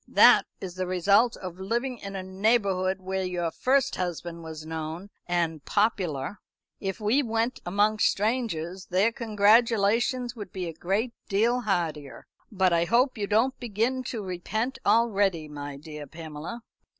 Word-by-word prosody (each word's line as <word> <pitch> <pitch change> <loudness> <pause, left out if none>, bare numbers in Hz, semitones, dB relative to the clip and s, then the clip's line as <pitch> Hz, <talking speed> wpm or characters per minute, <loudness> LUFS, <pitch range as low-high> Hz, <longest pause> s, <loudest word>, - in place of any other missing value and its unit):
"That - - +6
is 185 -2 -6
the 185 0 -3
result 200 +6 +3
of 185 -1 -8
living 240 +5 -2
in 200 0 -7
a 190 - -4
neighbourhood 190 -1 +1
where 190 +1 -2
your 175 -2 -2
first 265 +6 +1
husband 175 -1 -4
was 160 -1 -8
known 160 +4 -5 0.2
and 165 -4 -1
popular. 190 -6 0 0.4
If 195 -1 -3
we 220 +7 +2
went 230 0 -1
among 205 +4 +2
strangers, 195 -6 0
their 190 +6 +2
congratulations 230 +2 +2
would 205 -5 -8
be 185 -2 -4
a 165 - -5
great 200 +9 -1 0.2
deal 230 +5 +2
heartier. 165 - -2 0.3
But 190 -3 +2
I 170 0 +3
hope 250 +7 +3
you 205 -3 -3
don't 225 +6 +2
begin 240 +3 -1
to 230 -4 -4
repent 215 +7 -3
already, 200 -7 +2
my 145 -1 -7
dear 150 0 -9
Pamela." 160 - -8
195 Hz, 150 wpm, -27 LUFS, 175-225 Hz, 0.4 s, That